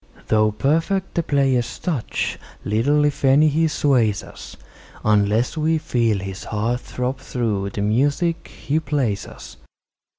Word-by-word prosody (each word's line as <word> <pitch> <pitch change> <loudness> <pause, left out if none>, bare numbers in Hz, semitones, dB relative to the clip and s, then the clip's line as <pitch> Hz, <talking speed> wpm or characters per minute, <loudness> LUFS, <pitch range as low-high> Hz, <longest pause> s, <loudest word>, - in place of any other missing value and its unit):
Though 110 0 +3
perfect 165 - 0
the 170 - +1
player's 135 -6 +1
touch, 155 - -2 0.3
little, 140 +8 +2
if 145 -1 -2
any, 140 +3 +5
he 160 +2 +2
sways 125 -9 +1
us, - - -11 0.5
Unless 105 +6 +2
we 160 +1 +2
feel 115 -8 0
his 95 0 -6
heart 115 +3 -1
throb 125 +1 -4
through 110 -7 -2
the 100 - -5
music 140 - 0
he 150 +3 -2
plays 135 -9 -1
us. - - -12
130 Hz, 135 wpm, -21 LUFS, 110-150 Hz, 0.5 s, any